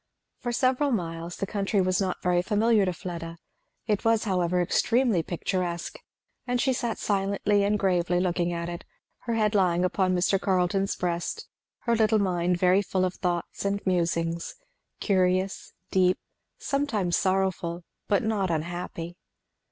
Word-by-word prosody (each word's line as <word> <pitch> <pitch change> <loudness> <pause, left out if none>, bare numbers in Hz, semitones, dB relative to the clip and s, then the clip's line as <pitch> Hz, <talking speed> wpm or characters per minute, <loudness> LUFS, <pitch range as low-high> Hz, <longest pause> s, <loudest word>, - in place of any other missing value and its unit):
For 240 - -3
several 255 +3 +2
miles 170 -4 -3
the - - -2
country 200 +1 -1
was 185 +1 +2
not 185 -2 -2
very 180 -1 +3
familiar 210 +1 +3
to 185 - 0
Fleda. 170 -2 -6 0.5
It 210 -3 0
was 225 -1 +3
however 180 -4 +1
extremely 225 +3 +2
picturesque; 175 +1 -3 0.5
and 245 0 0
she 265 +1 +2
sat 235 -2 -2
silently 200 0 +1
and 205 +1 +2
gravely 180 -3 +1
looking 175 -1 0
at 170 0 -3
it, 175 +1 -6 0.4
her 230 - 0
head 215 -1 +2
lying 180 -3 +3
upon 185 0 +1
Mr. 185 +2 +2
Carleton's 190 +1 +1
breast, 175 - -3 0.3
her 235 -1 +1
little 220 0 +3
mind 180 -3 +1
very 185 +2 +4
full 185 -2 0
of 185 - -2
thoughts 175 -2 -3
and 200 0 -1
musings, 170 -2 0 0.4
curious, 185 -1 +1 0.2
deep, 185 -1 +3 0.4
sometimes 235 - 0
sorrowful, 185 -3 0 0.2
but 200 - +2
not 210 -4 0
unhappy. 170 +1 -4
185 Hz, 145 wpm, -27 LUFS, 175-205 Hz, 0.5 s, very